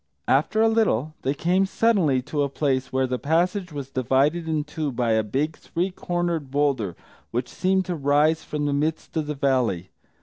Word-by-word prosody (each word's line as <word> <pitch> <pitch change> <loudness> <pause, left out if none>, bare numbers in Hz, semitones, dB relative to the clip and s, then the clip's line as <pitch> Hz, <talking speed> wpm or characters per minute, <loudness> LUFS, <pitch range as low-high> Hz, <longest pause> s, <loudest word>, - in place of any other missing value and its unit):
After 155 +11 +3
a - - +5
little 185 - +1
they 135 +2 -1
came 180 +5 +2
suddenly 185 - +2
to 145 +3 -2
a 140 - +1
place 135 -2 -1
where 130 0 +1
the 125 -1 -2
passage 175 +4 0
was 140 -2 -6
divided 135 +7 +1
in 155 -2 0
two 150 -1 -3
by 120 -2 0
a 110 0 +3
big 140 +9 -1
three 180 +3 -3
cornered 175 -5 -2
boulder 135 - 0 0.3
which 120 +2 -2
seemed 190 0 0
to 180 - -2
rise 150 +2 +2
from 150 -1 -3
the 145 - 0
midst 155 +4 -2
of 155 -2 -1
the 150 - -3
valley. 125 -10 0
145 Hz, 190 wpm, -24 LUFS, 130-170 Hz, 0.3 s, a